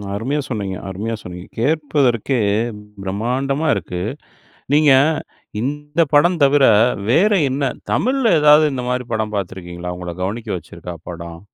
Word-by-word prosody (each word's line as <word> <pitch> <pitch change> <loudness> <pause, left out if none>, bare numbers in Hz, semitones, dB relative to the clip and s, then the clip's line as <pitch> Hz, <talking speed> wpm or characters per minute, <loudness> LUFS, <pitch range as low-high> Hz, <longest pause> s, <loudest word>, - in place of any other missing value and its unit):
அருமையா 130 +8 -1
சொன்னீங்க 100 -5 -3
அருமையா 105 +5 -3
சொன்னீங்க. 90 0 -9
கேட்பதற்கே 140 -4 +1 0.6
பிரம்மாண்டமா 130 +10 -1
இருக்கு. 90 -2 -4 0.7
நீங்க 150 -1 +5 0.7
இந்த 150 +4 -2
படம் 170 +4 +4
தவிர 140 0 +4 0.5
வேற 195 - +4 0.2
என்ன 135 0 -1 0.2
தமிழ்ல 255 -6 +2
ஏதாவது 150 +1 +7
இந்த 125 -1 -3
மாதிரி 125 0 -1
படம் 110 -1 -2
பார்த்திருக்கிறீங்களா? 90 -2 -5
உங்கள 90 -1 -6
கவனிக்க 110 +3 -4
வச்சிருக்கா 85 +1 -9
படம்? 85 -1 -8
125 Hz, 120 wpm, -19 LUFS, 95-145 Hz, 0.7 s, ஏதாவது